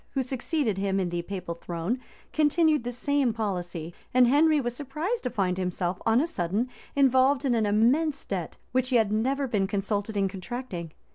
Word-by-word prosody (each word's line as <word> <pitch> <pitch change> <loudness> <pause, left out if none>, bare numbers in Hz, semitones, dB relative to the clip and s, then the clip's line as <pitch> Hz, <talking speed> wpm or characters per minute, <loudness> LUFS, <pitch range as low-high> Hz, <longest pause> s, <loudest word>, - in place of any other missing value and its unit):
who 265 - +2
succeeded 255 - -1
him 195 0 0
in 185 -2 0
the 175 0 -2
papal 180 -1 -5
throne, 170 +7 -3 0.3
continued 310 -2 +3
the 245 - -3
same 270 +1 +1
policy, 175 -6 -3 0.2
and 255 -1 +7
Henry 300 +4 +4
was 240 -3 -2
surprised 305 - -3
to 250 - -2
find 190 -5 0
himself 180 0 -2
on 225 +2 +5
a 300 - +2
sudden 205 - -1 0.3
involved 270 0 +4
in 255 - +2
an 220 -3 +2
immense 270 +8 +2
debt, 180 -5 -4
which 255 0 +1
he 255 - +1
had 220 -3 +3
never 265 +6 +1
been 205 -5 +1
consulted 205 +1 -2
in 195 -1 +2
contracting. 190 -3 -6
230 Hz, 185 wpm, -27 LUFS, 190-270 Hz, 0.3 s, and